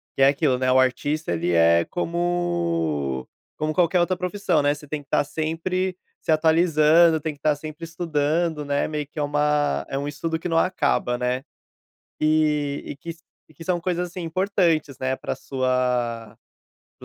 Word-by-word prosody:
Que 135 - +3
é - - +8
aquilo, 140 -2 +2
né, 130 0 +1
o 130 - +5
artista 140 - 0
ele 85 +1 -1
é 85 0 +4
como 170 - -1 0.3
como 155 0 -1
qualquer 180 0 +3
outra 180 +1 +1
profissão, 180 -4 0
né, 145 0 +3
você 150 0 -12
tem 145 0 -4
que 140 - -38
tá - - +3
sempre 165 +5 -2 0.2
se - - -2
atualizando, 160 0 +4
tem 155 0 -4
que 145 - -27
tá 150 0 +2
sempre 155 +2 -9
estudando, 160 -1 -1
né, 140 0 0
meio 150 -1 -3
que 150 - -9
é - - +1
uma 145 - +1
é 135 - -3
um 140 - -3
estudo 160 +3 -3
que 175 - -4
não 165 - +1
acaba, 150 -8 +1
né. 125 +2 -1 0.8
Eh, 150 -2 +1
e 140 - -6
que 170 +4 -8
s 165 - -9 0.3
e - - -20
que 165 - -11
são 180 0 0
coisas 180 0 -1
assim 180 +1 -8
importantes, 170 -5 0
né, 130 0 -1
pra - - -4
sua 125 -4 -1 0.6
para - - -12
155 Hz, 185 wpm, -23 LUFS, 135-170 Hz, 0.8 s, é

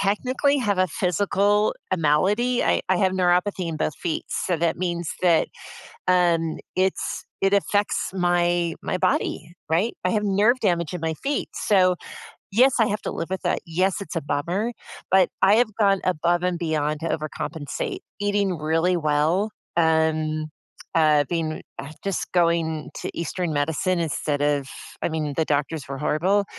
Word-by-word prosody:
technically 255 +8 +1
have 205 -7 0
a 185 - +4
physical 200 +4 +1 0.2
eh - - +3
malady. 200 +11 +2
I - - +2
I 185 - +3
have 185 +1 +2
neuropathy 180 0 +1
in 160 - -3
both 155 -1 -1
feet, 165 -3 -3
so 175 - -1
that 165 0 0
means 175 -2 -2
that, 170 -3 +4 0.6
um, 170 -3 +2 0.2
it's 190 0 -1 0.2
it 195 0 +3
affects 205 +1 +1
my, 175 -2 +1
my - - -1
body, 185 -2 -1 0.2
right? 185 +9 +1
I - - +2
have 215 -2 +1
nerve 205 +5 +3
damage 170 -5 0
in 175 - -5
my 160 0 0
feet, 285 +1 -1
so, 185 -3 +3 0.6
yes, 255 +5 +5
I 225 - +4
have 210 0 -2
to - - -3
live 165 - -4
with 190 0 -4
that, - - +1
yes, 185 +3 0
it's 200 - -7
a - - +1
bummer, 170 +10 -1 0.4
but 190 -1 +5
I 195 +2 +6
have 245 - +4
gone 195 -2 +4
above 175 0 +1
and 180 -1 0
beyond 155 -2 -1
to 165 - -2
overcompensate. 160 - -4 0.2
Eating 205 -3 +1
really 165 +4 +1
well, 160 +6 +1 0.3
um, 160 -1 +2 0.5
uh, 155 -2 +4
being 160 -2 -2 0.2
uh, 140 - -8
just 195 -2 -2
going 165 -3 +1
to - - -4
Eastern 170 +1 -2
medicine 160 +5 0
instead 150 -3 -1
of 145 -2 +1 0.3
I - - +1
mean, 155 -3 -2
the 160 - +2
doctors 150 0 -1
were 135 0 -5
horrible, 185 +8 +1
175 Hz, 165 wpm, -24 LUFS, 160-195 Hz, 0.6 s, I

